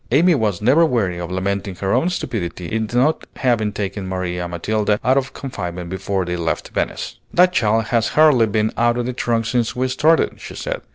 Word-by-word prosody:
Amy 170 +8 +4
was 105 - 0
never 140 +9 +5
weary 110 - 0
of 85 -1 -5
lamenting 95 +1 -2
her 95 +2 -1
own 130 +9 +2
stupidity 90 - -4
in 110 +4 -2
not 130 +6 +2
having 115 -5 +1
taken 100 -2 -4
Maria 90 -1 -3
Matilda 105 +4 0
out 130 - +3
of 135 -1 -1
confinement 90 -9 -6
before 95 0 -2
they 90 0 -2
left 85 -1 -2
Venice. - - -3
"That 180 +1 +4
child 110 -5 +2
has 115 -1 +3
hardly 145 -7 +6
been 110 +1 0
out 120 0 +2
of 120 - -1
the 125 - -3
trunk 115 -2 0
since 120 0 0
we 130 +1 0
started," 155 +5 +2
she - - -9
said. - - -4
110 Hz, 195 wpm, -20 LUFS, 95-130 Hz, -, hardly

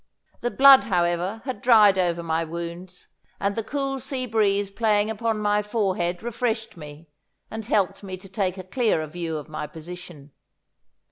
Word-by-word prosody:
The 240 - -1
blood, 270 +1 +7
however, 180 +2 0
had 255 -7 -5
dried 210 -5 +6
over 170 -2 0
my 165 0 0
wounds, 170 +2 -7 0.3
and 200 0 -1
the 225 - -2
cool 275 +3 -3
sea 265 -1 -3
breeze 205 -3 +1
playing 210 0 +1
upon 225 0 -1
my 210 0 +2
forehead 190 -4 -1
refreshed 225 -1 -2
me, 150 0 -11 0.4
and 220 0 -5
helped 200 -5 +1
me 190 -2 -7
to 190 +1 -14
take 190 -1 -2
a 185 - -6
clearer 185 -5 0
view 165 0 -4
of 150 - -8
my 155 -1 -5
position. 165 -3 -11
195 Hz, 160 wpm, -24 LUFS, 175-225 Hz, 0.4 s, blood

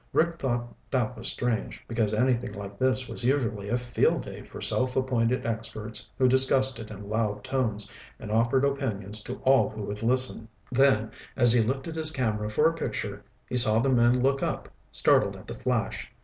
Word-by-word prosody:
Rick 170 +1 +1
thought 120 -2 -2 0.2
that 125 -2 -1
was 115 +2 -4
strange, 120 -3 -3
because 115 -3 0
anything 120 0 0
like 100 0 -8
this 130 0 +1
was - - -4
usually 115 -6 0
a 120 - +1
field 120 0 0
day - - -9
for - - -11
self 130 0 +4
appointed 125 -2 0
experts 110 -1 -5
who 130 - +4
discussed 130 -1 +3
it 110 -1 -8
in 100 -1 -9
loud 105 -1 -2
tones 110 -6 -2 0.3
and 105 - -8
offered 115 +5 +2
opinions 110 -7 -1
to - - -6
all 135 0 +4
who 110 -1 -7
would 105 +1 -5
listen. 125 -1 +1 0.2
Then, 125 -4 +3 0.2
as 120 -2 +5
he 120 - +4
lifted 135 +8 -3
his 160 -1 +1
camera 110 -7 -2
for 150 +9 +3
a 165 - +1
picture, 105 -9 -4 0.2
he 125 - -2
saw 110 -3 +5
the 130 +4 +2
men 120 0 +3
look 135 +1 +1
up, - - -3 0.2
startled - - +2
at - - -12
the - - -8
flash. - - -2
120 Hz, 190 wpm, -27 LUFS, 110-130 Hz, 0.3 s, as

